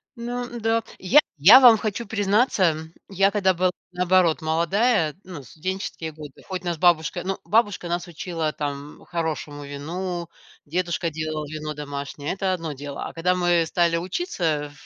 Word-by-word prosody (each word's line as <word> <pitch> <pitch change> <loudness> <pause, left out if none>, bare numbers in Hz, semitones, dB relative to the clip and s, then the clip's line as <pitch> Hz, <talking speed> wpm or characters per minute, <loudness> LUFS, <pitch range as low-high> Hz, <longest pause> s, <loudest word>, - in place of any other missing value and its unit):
Ну 240 0 -5
да. 225 0 +1 0.2
Я 245 +11 +6 0.2
я 200 - +9
вам 240 -4 +8
хочу 215 +1 -3
признаться, 205 -4 +2 0.3
я 195 +1 +3
когда 190 -2 +2
была, 180 +1 +1 0.2
наоборот, 180 -2 +2
молодая, 170 +2 +1
ну, 180 -6 -8
в - - -16
студенческие 170 -2 -5
годы, 150 -3 -11
хоть 185 -1 -5
нас 170 -2 -2
бабушка- 175 +1 +2
ну, 195 0 -2
бабушка 205 -6 +1
нас 175 +1 -2
учила 165 -2 -3
там 145 0 -6
хорошему 155 -3 -4
вину, 170 +4 -5 0.4
дедушка 170 +1 -1
делал 155 -1 -4
вино 155 0 -5
домашнее, 145 +1 -5
это 190 -1 -1
одно 165 -4 -4
дело- 140 +1 -6
а - - -10
когда 180 +2 +1
мы 175 -2 +2
стали 170 0 +1
учиться 165 - -2
175 Hz, 155 wpm, -24 LUFS, 155-190 Hz, 0.4 s, я